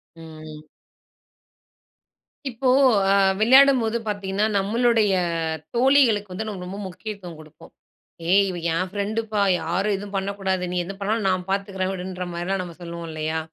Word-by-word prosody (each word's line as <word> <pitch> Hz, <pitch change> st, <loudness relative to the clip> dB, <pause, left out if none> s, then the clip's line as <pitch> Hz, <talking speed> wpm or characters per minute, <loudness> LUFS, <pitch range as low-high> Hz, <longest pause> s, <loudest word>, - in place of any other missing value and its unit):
ம். 155 Hz, -2 st, -11 dB, 1.9 s
இப்போ 255 Hz, +1 st, -1 dB, 0.4 s
அ 195 Hz, -, +4 dB, 0.2 s
விளையாடும்போது 245 Hz, -1 st, +5 dB
பாத்தீங்கன்னா, 200 Hz, 0 st, -1 dB
நம்மளுடைய 225 Hz, +2 st, +2 dB, 0.7 s
தோழிகளுக்கு 240 Hz, -6 st, +3 dB
வந்து 220 Hz, +4 st, -4 dB
நம்ம 195 Hz, -4 st, -6 dB
ரொம்ப 190 Hz, +2 st, -7 dB
முக்கியத்துவம் 185 Hz, -1 st, -8 dB
குடுப்போம். 155 Hz, -1 st, -15 dB, 0.6 s
"ஏய்! 200 Hz, +2 st, +5 dB
இவ 180 Hz, -, -5 dB, 0.2 s
என் 185 Hz, +3 st, -1 dB
ஃப்ரெண்டுப்பா. 210 Hz, +1 st, -2 dB, 0.2 s
யாரும் 180 Hz, +6 st, 0 dB
எதுவும் 200 Hz, +1 st, -7 dB
பண்ணக்கூடாது. 195 Hz, -1 st, -2 dB
நீ 180 Hz, -, -2 dB
எது 185 Hz, +3 st, -7 dB
பண்ணாலும் 210 Hz, +1 st, 0 dB
நான் 185 Hz, -1 st, -1 dB
பார்த்துக்கிறேன்." 195 Hz, -1 st, -2 dB
அப்படீன்ற 185 Hz, -1 st, -5 dB
மாரிலாம் 180 Hz, +3 st, -2 dB
நம்ம 170 Hz, -2 st, -9 dB
சொல்லுவோம் 170 Hz, -1 st, -7 dB
இல்லையா? 155 Hz, +1 st, -2 dB
195 Hz, 130 wpm, -23 LUFS, 180-215 Hz, 1.9 s, விளையாடும்போது